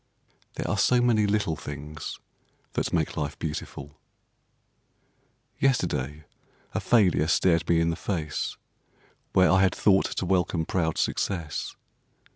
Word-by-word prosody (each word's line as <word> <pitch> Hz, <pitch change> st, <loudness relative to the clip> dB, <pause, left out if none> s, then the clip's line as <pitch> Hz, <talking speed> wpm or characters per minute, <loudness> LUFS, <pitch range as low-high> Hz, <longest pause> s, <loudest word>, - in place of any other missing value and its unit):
There -, -, -3 dB
are -, -, 0 dB
so 125 Hz, -, +4 dB
many 115 Hz, -4 st, +3 dB
little 105 Hz, -5 st, 0 dB
things 75 Hz, +1 st, -7 dB, 0.5 s
that -, -, -1 dB
make 80 Hz, -3 st, 0 dB
life 75 Hz, -1 st, -3 dB
beautiful. 75 Hz, -2 st, -6 dB, 1.6 s
Yesterday 75 Hz, -, 0 dB, 0.5 s
a -, -, 0 dB
failure 90 Hz, -9 st, +3 dB
stared 85 Hz, 0 st, +2 dB
me 85 Hz, -1 st, +4 dB
in 85 Hz, 0 st, +2 dB
the -, -, -2 dB
face, 80 Hz, -5 st, -3 dB, 0.8 s
where 95 Hz, -1 st, +5 dB
I 95 Hz, -, +5 dB
had 95 Hz, -1 st, +3 dB
thought 95 Hz, -2 st, +3 dB
to -, -, -3 dB
welcome 90 Hz, -2 st, +1 dB
proud 80 Hz, -3 st, -1 dB
success. 85 Hz, -6 st, -2 dB
85 Hz, 125 wpm, -26 LUFS, 75-95 Hz, 1.6 s, where